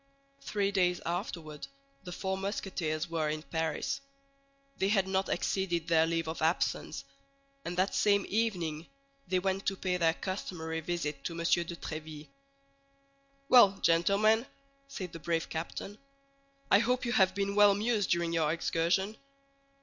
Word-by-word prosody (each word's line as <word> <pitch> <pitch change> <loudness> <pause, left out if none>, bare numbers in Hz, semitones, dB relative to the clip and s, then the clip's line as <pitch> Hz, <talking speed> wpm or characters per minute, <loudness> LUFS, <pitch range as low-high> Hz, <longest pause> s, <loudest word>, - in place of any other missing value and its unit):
Three 200 -6 -1
days 180 -3 +2
afterward 165 -3 -4 0.4
the 180 - -6
four 190 +2 -2
Musketeers 190 -5 -3
were 160 -2 -1
in 155 0 -3
Paris; 160 - -2 0.8
they 190 - +1
had 195 -2 +2
not 190 0 0
exceeded 175 -4 -1
their 160 -1 +4
leave 165 -1 -1
of 160 - -4
absence, 160 +2 0 0.6
and 175 - -5
that 185 +2 +2
same 200 -1 +3
evening 175 -8 -1 0.4
they 185 +1 +1
went 190 +1 -1
to 195 - 0
pay 180 -1 -1
their 165 -2 +2
customary 170 -4 -4
visit 160 -4 -3
to 170 - -2
M. - - -7
de 170 0 +1
Tréville. 155 -2 -7 1.2
"Well, 205 -7 +7
gentlemen," 205 +8 +3 0.4
said 185 -10 -6
the 165 - -7
brave 165 +1 -1
captain, 175 +5 -5 0.7
"I 200 - +7
hope 250 +3 +1
you 235 - -1
have 190 -5 +3
been 200 0 -1
well 205 0 +7
amused 210 0 +1
during 170 -1 +1
your 160 -2 +2
excursion." 170 +5 0
180 Hz, 145 wpm, -31 LUFS, 165-200 Hz, 1.2 s, Well